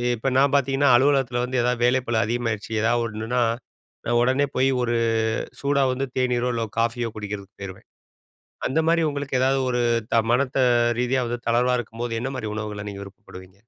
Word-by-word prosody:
இப்ப 115 - -4
நான் 140 +1 +3
பாத்தீங்கன்னா, 135 0 +2
அலுவலகத்தில 130 -2 +2
வந்து 125 0 -1
ஏதாவது 125 0 0
வேலைப்பலு 125 -2 +1
அதிகமாயிருச்சு, 115 -1 -2
ஏதாவது 120 +1 +2
ஒண்ணுன்னா, 115 +3 -2 0.6
நான் 120 0 +2
உடனே 130 +3 +2
போயி 130 +1 +3
ஒரு 120 -1 0 0.7
சூடா 140 0 +1
வந்து 135 +2 -2
தேனீரோ, 125 -1 +1
இல்லை 115 -1 -1
காஃபியோ 115 0 0
குடிக்கிறதுக்கு 105 -2 -7
போயிருவேன். 95 -1 -9 0.8
அந்த 140 +5 +1
மாரி 165 0 +3
உங்களுக்கு 140 -2 -2
ஏதாவது 135 +1 +2
ஒரு 125 - 0 0.3
த 115 - +4
மனத்த 130 +1 +1 0.4
ரீதியா 125 +1 +1 0.3
தளர்வா, 125 +2 +2
இருக்கும்போது 115 0 -5
என்ன 130 - -2
மாரி 110 - -4
உணவுகள 105 -1 -5
நீங்க 100 0 -8
விருப்பப்படுவீங்க. 95 -1 -13
120 Hz, 160 wpm, -23 LUFS, 115-130 Hz, 0.8 s, த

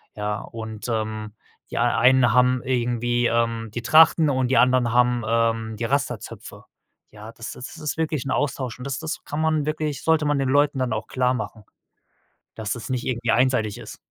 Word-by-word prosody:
Ja, 105 0 -2
und, 110 -1 -8
ähm, 110 -2 -3 0.4
die - - -4
ei 120 0 +2
einen 125 0 +5
haben 125 0 +3
irgendwie, 120 -1 0
ähm, 115 -1 0
die 120 - -3
Trachten 160 +2 +6
und 130 -2 0
die 135 - +2
anderen 125 -2 +3
haben, 125 -1 +3
ähm, 115 -1 0
die 115 - -2
Rastazöpfe. 135 -5 -4 0.5
Ja, 105 +1 -11
das 115 - -8
ist 125 - -7
das - - -12
ist 150 +1 -4
wirklich 155 -4 -1
'n 135 - -3
Austausch 130 -3 -2
und 125 - -8
das 135 0 -3
das 160 0 -5
kann 150 +2 -3
man 155 -2 +1
wirklich 155 -2 -3
sollte 160 -1 +3
man 145 -1 +1
den 135 -1 0
Leuten 145 0 +2
dann 130 -1 -1
auch - - -4
klarmachen, 125 -4 -2 0.9
dass 110 -1 -3
das 120 - -8
nicht 125 -2 -2
irgendwie 120 -2 0
einseitig 120 -4 +1
ist. - - -10
125 Hz, 190 wpm, -23 LUFS, 115-135 Hz, 0.9 s, Trachten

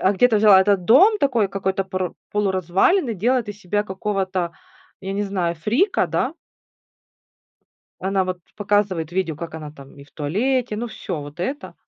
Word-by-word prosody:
а 190 - +3
где-то 225 +3 +3
взяла 205 -3 +7
этот 195 -2 +2
дом 375 - +6
такой 245 - +2
какой-то 190 0 -2
пор 185 -2 -3 0.2
полуразваленный, 205 - +1
делает 235 +3 0
из 205 -1 -7
себя 205 +3 -1
какого-то, 190 -3 -2 0.5
я 195 0 -5
не 200 +1 -1
знаю, 180 -4 -1
фрика, 245 - +1
да - - -1 1.7
Она 190 0 0
вот 185 0 -3 0.2
показывает 200 -6 0
видео, 175 -4 -1
как 165 0 -7
она 150 -2 -8
там 140 -1 -15
и 140 - -12
в 140 - -23
туалете, 220 - -1
ну, 240 - -3
всё 180 -7 -5
вот 145 +3 -11
это. 270 - -4
195 Hz, 160 wpm, -22 LUFS, 180-215 Hz, 1.7 s, взяла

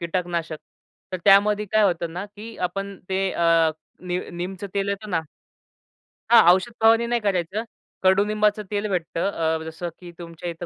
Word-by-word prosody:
कीटकनाशक 170 -2 -3 0.5
तर - - 0
त्यामध्ये 205 +1 +5
काय 215 - +4
होतं 170 -4 0
ना, 180 +3 -4
की 215 +2 -11
आपण 195 +1 -6
ते 190 0 0
अ, 165 -1 +3 0.3
नीम 180 0 -3
नीमचं 185 +3 -5
तेल 200 0 0
येतं 200 +1 -4
ना 165 -3 +1 1.1
हां, 235 -1 +8
औषध 225 +5 -1
फवारणी 225 +1 +5
नाही 240 0 0
करायचं. 195 +1 -1 0.4
कडूनिंबाचं 210 +2 +2
तेल 205 0 -1
भेटतं 175 0 -1
अ, 160 -2 -1
जसं 160 +2 -6
की 175 -1 -11
तुमच्या 170 0 -7
इथं 170 +1 -6
190 Hz, 160 wpm, -23 LUFS, 170-210 Hz, 1.1 s, हां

